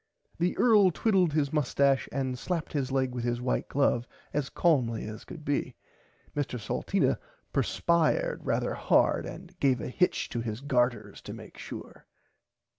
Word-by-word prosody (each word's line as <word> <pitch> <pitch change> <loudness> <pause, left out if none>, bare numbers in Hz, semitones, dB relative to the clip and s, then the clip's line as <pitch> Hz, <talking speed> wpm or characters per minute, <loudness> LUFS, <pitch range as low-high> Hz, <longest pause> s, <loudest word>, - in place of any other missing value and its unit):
The 175 +1 +1
earl 210 -5 +6
twiddled 185 -2 +2
his 150 -1 +1
mustache 140 -2 +2
and 130 -1 -1
slapped 170 +1 -3
his 135 -3 -1
leg 130 -1 +1
with 120 -1 -3
his 120 0 0
white 125 +1 -1
glove 130 -3 +2 0.3
as 145 -2 -1
calmly 125 -10 +1
as 110 0 -8
could 155 -3 -10
be. 145 - -1 0.6
Mr 140 -4 -2
Salteena 105 - 0 0.3
purspired 175 - +1
rarther - - 0
hard - - +2
and 185 0 -9
gave 130 -3 +3
a - - -4
hitch 180 +8 +1
to 120 - -2
his 110 0 -4
garters 125 -5 0
to - - -8
make - - -11
sure. - - -9
140 Hz, 155 wpm, -29 LUFS, 125-170 Hz, 0.6 s, earl